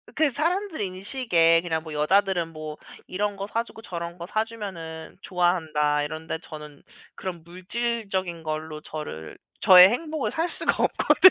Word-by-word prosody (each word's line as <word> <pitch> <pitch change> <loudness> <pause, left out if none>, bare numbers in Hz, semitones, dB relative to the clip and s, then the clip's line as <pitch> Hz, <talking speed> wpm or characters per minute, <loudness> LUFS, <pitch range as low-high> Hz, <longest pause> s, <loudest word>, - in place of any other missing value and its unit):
그 305 -3 +3
사람들 350 - 0
인식에 185 -4 +2
그냥 160 -2 -2
뭐 160 -2 -8
'여자들은 175 +3 +2
뭐 155 -1 -7 0.3
이런 205 +2 -1
거 195 0 -5
사 230 - +2
주고 225 - -13
저런 170 -2 -5
거 170 0 -7
사 215 +1 +1
주면은 175 -8 -7
좋아한다.' 160 -6 +1
이런데 155 +2 -4
저는 150 -2 -10 0.3
그런 175 -4 -6
물질적인 185 -1 -3
걸로 155 0 -4
저를 150 - -7 0.2
저의 185 0 +10
행복을 305 +5 -2
살 330 +2 -1
수가 - - +2
없거든요. 375 - +6
180 Hz, 315 characters per minute, -26 LUFS, 160-215 Hz, 0.3 s, 저의